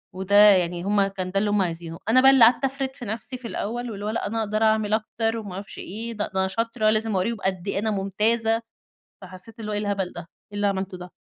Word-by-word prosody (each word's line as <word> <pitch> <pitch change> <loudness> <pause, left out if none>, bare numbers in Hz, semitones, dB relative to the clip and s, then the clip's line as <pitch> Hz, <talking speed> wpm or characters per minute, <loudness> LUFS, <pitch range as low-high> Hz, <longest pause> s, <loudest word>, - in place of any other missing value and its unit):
وده 190 +2 -1
يعني 180 -4 +5
هُم 200 0 +2
كان 185 -2 -5
ده 195 - +1
اللي 210 - 0
هُم 205 -1 +2
عايزينه، 165 -2 -4
أنا 255 +3 +6
بقى 265 +1 +8
اللي 265 -3 +6
قعدت 240 +4 +3
أفرد 270 0 -2
نفسي 230 +4 -5
في 250 -2 -8
الأول 235 +3 -4
واللي 205 -1 -6
هو - - -1
لأ 220 - -2
أنا 225 +2 -2
أقدر 215 0 0
أعمل 215 -1 +2
أكتر 225 +1 -1
وما 205 -4 -7
أعرفش 195 +1 -8
إيه، 225 +4 -6
د - - -12
ده 210 - -2
أنا 190 0 +2
شاطرة، 230 +2 0
لازم 215 -1 +1
أورّيهم 225 +5 0
قد 190 -1 -2
إيه 200 - -1
أنا 220 +1 -1
ممتازة، 220 +3 0 0.6
فحسيت 190 +4 -11
اللي 215 -1 -5
هو - - -2
إيه 205 - -1
الهبل 200 -3 -2
ده؟! - - -8
إيه 180 +4 -17
اللي 205 0 +1
عملته 190 -1 -2
ده؟ 180 0 -10
210 Hz, 245 wpm, -24 LUFS, 190-225 Hz, 0.6 s, بقى